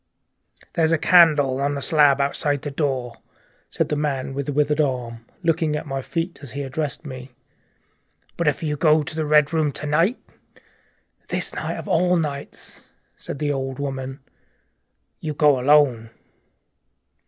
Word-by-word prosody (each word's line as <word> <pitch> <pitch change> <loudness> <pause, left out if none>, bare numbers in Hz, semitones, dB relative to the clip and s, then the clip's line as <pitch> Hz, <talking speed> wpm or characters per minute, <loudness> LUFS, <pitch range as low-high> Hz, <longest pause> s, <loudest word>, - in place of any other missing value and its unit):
"There's 160 -1 +2
a 165 - +4
candle 150 -6 +4
on 145 +1 0
the - - -3
slab 145 -3 +4
outside 140 0 0
the 145 - -4
door," 135 -5 -2 0.5
said - - -1
the 150 - 0
man 140 -3 -2
with 140 0 -4
the - - -1
withered 150 +1 +1
hand, 125 -5 -2 0.2
looking 165 -2 +1
at 150 - -4
my 135 0 -3
feet 165 +5 -4
as 140 - -8
he 140 +1 -4
addressed 145 +3 -4
me. 130 -2 -8 1.1
"But 170 - -1
if 150 +2 0
you 150 -1 -1
go 155 0 +4
to 150 - -7
the 155 -1 -2
Red 150 +1 +4
Room 155 -3 +1
to 150 - -5
night 165 - +2 0.6
" - - -41
"This - - -1
night - - -4
of - - -7
all 180 +2 +2
nights!" 145 -4 -5 0.3
said - - -7
the 145 +1 -1
old 135 -1 -4
woman, 135 -2 -4
softly. - - -39 0.4
" - - -50
You 155 -1 -3
go 145 -3 +4
alone." 130 -4 +3
145 Hz, 170 wpm, -22 LUFS, 135-155 Hz, 1.1 s, a